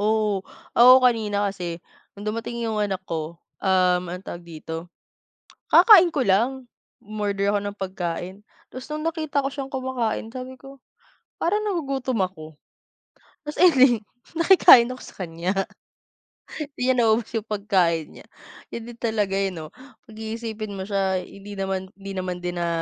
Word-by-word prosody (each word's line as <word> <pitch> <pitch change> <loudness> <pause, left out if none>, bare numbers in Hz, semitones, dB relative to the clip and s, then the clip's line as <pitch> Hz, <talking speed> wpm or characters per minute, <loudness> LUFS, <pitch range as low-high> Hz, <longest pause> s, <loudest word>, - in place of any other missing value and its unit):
Oo. 210 -2 +1 0.4
Ako 255 +2 +8
kanina 210 -5 +2
kasi, 175 -3 -6 0.3
nung 205 +1 -10
dumating 230 +2 -4
'yong 220 -2 -2
anak 195 -2 -2
ko, 160 0 -4 0.3
um, 185 -2 +3
anong 180 +2 -7
tawag 175 0 -7
dito, 165 +1 -7 0.8
kakakain 365 -6 +8
ko 290 - -1
lang, 200 +6 +3 0.5
um-order 205 -2 -2
ako 205 - +2
ng 205 0 -5
pagkain. 185 -1 -4 0.4
Tapos 255 0 -8
nung 305 +1 -4
nakita 310 -4 -1
ko 275 - +1
siyang 275 -1 -6
kumakain, 255 -4 -2
sabi 260 0 -7
ko, 275 0 -13 0.6
parang 415 +5 +1
nagugutom 270 - -2
ako, 155 -4 -9 0.9
ta's 295 - -6
ayan 260 -10 +6 0.3
nakikain 330 -8 +7
ako 255 - -9
sa - - -13
kanya. 170 +2 -3 1.2
Hindi 255 +1 +2
niya 255 - -2
naubos 225 0 +2
'yong 220 -1 -3
pagkain 190 -6 +1
niya, - - -14 0.4
yun 230 - -7
din 235 0 -11
talaga 215 -4 0
eh 195 0 +1
'no. 160 -4 -8 0.3
Pag-iisipin 220 -2 -6
mo 190 - -4
siya, 195 -2 0
hindi 200 +1 -11
naman 190 -1 -3
hindi 195 0 -8
naman 185 -1 -3
din 175 0 -3
na 170 - 0
210 Hz, 150 wpm, -24 LUFS, 190-250 Hz, 1.2 s, Ako